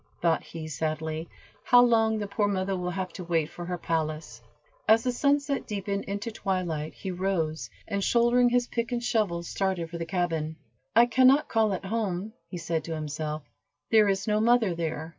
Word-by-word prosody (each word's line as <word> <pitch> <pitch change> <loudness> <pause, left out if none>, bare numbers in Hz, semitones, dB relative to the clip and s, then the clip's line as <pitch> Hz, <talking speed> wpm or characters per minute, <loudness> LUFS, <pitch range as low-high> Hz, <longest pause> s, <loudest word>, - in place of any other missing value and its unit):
thought 165 -2 +2
he, 160 -1 -8
sadly, 155 +1 -3 0.3
"how 245 - +6
long 225 -2 +4
the 210 - -2
poor 205 +1 0
mother 195 -1 -1
will 180 -1 -2
have 185 0 -4
to 185 - -7
wait 165 -3 0
for 175 - -7
her 180 0 -3
palace." 155 -7 -3 0.5
As 225 +1 +5
the 255 - +1
sunset 280 +2 +1
deepened 200 -1 -3
into 205 +4 -4
twilight, 175 -7 -2
he 190 - -5
rose, 175 -4 -1 0.2
and 200 -2 -1
shouldering 240 +2 +4
his 245 0 +2
pick 235 0 -3
and 240 -1 -1
shovel, 200 -8 0
started 180 -2 -2
for 170 - -5
the 165 - -3
cabin. 165 -4 -1 0.4
"I 235 +1 +8
can 255 +2 +4
not 275 +3 +4
call 220 -3 +2
it 190 - -4
home," 205 -1 -2
he 180 - -6
said 165 -1 -2
to 165 - -3
himself, 155 0 -4 0.5
"there 215 -2 +6
is 195 -1 0
no 210 -1 +1
mother 225 -4 +3
there." 160 -1 -3
190 Hz, 190 wpm, -27 LUFS, 165-225 Hz, 0.5 s, I